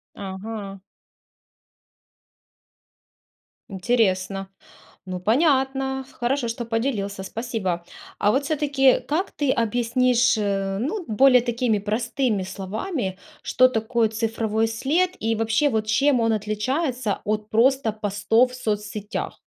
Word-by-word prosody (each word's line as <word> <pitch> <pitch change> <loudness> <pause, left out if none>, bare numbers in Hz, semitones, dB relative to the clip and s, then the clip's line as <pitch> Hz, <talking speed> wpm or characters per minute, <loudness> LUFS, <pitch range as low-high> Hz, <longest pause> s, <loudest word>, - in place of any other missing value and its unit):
Ага. 195 +1 -6 2.9
Интересно. 195 -2 0 0.6
Ну 180 -1 -4
понятно, 265 - +1
хорошо, 245 +1 -1
что 230 +1 -4
поделился, 225 -4 -2
спасибо! 190 -5 -3 0.3
А 205 - +3
вот 275 +2 +1
всё-таки, 280 -3 +3
как 335 +7 -2
ты 285 -3 0
объяснишь, 240 +1 +2
ну, 205 - -1
более 250 +2 +5
такими, 240 -3 0
простыми 220 +1 -1
словами, 195 - -4 0.2
что 255 0 +4
такое 225 -1 0
цифровой 220 0 -1
след 285 +11 +1
и 225 +1 0
вообще 225 +6 +2
вот 220 -3 -1
чем 255 +3 +3
он 225 0 +2
отличается 220 +3 -1
от 215 0 -2
просто 235 0 +3
постов 215 +4 +1
в - - -9
соцсетях. 210 -2 -4
225 Hz, 105 wpm, -23 LUFS, 210-260 Hz, 2.9 s, более